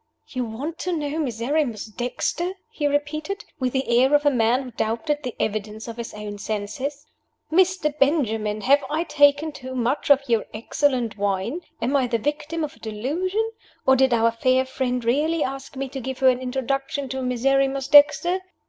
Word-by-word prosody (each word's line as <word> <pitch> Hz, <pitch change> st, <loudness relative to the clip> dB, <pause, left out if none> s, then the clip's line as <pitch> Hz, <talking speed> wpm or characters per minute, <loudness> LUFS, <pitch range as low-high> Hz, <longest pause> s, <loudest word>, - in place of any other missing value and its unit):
"You 255 Hz, -3 st, -2 dB
want 280 Hz, +10 st, -5 dB
to 360 Hz, -2 st, -1 dB
know 295 Hz, +1 st, -2 dB
Miserrimus 245 Hz, -2 st, -1 dB
Dexter?" 250 Hz, -, -2 dB, 0.2 s
he 300 Hz, -10 st, -1 dB
repeated, 305 Hz, +7 st, -2 dB
with 255 Hz, -2 st, 0 dB
the 245 Hz, -2 st, +2 dB
air 265 Hz, +3 st, +4 dB
of 295 Hz, 0 st, +2 dB
a 290 Hz, -, +5 dB
man 245 Hz, +1 st, +2 dB
who 255 Hz, -, -9 dB
doubted 230 Hz, +6 st, -1 dB
the 250 Hz, -5 st, -5 dB
evidence 215 Hz, +1 st, -3 dB
of 230 Hz, 0 st, -7 dB
his 235 Hz, -1 st, -5 dB
own 210 Hz, -1 st, -6 dB
senses. 220 Hz, +8 st, -4 dB, 0.5 s
"Mr. 360 Hz, -3 st, +2 dB
Benjamin, 225 Hz, -8 st, +1 dB
have 280 Hz, +6 st, +4 dB
I 315 Hz, +3 st, 0 dB
taken 290 Hz, 0 st, +3 dB
too 260 Hz, -2 st, -8 dB
much 250 Hz, +5 st, -1 dB
of 275 Hz, -1 st, +5 dB
your 230 Hz, -3 st, +1 dB
excellent 240 Hz, -1 st, 0 dB
wine? 200 Hz, -, -1 dB, 0.2 s
Am 260 Hz, +4 st, +1 dB
I 265 Hz, -3 st, +3 dB
the 235 Hz, -1 st, 0 dB
victim 295 Hz, +6 st, -2 dB
of 305 Hz, +1 st, -4 dB
a -, -, -22 dB
delusion 325 Hz, -, -2 dB, 0.4 s
or 265 Hz, -, +6 dB
did 265 Hz, 0 st, +3 dB
our 230 Hz, -1 st, +3 dB
fair 255 Hz, +3 st, +2 dB
friend 250 Hz, -2 st, -2 dB
really 300 Hz, +6 st, +2 dB
ask 270 Hz, +1 st, -5 dB
me 270 Hz, 0 st, -3 dB
to 270 Hz, -, -6 dB
give 265 Hz, +1 st, -4 dB
her 265 Hz, -, +5 dB
an 250 Hz, -1 st, +1 dB
introduction 270 Hz, +2 st, -2 dB
to 265 Hz, +1 st, -3 dB
Miserrimus 270 Hz, +2 st, +1 dB
Dexter?" 300 Hz, +5 st, +6 dB
265 Hz, 180 wpm, -23 LUFS, 235-290 Hz, 0.5 s, or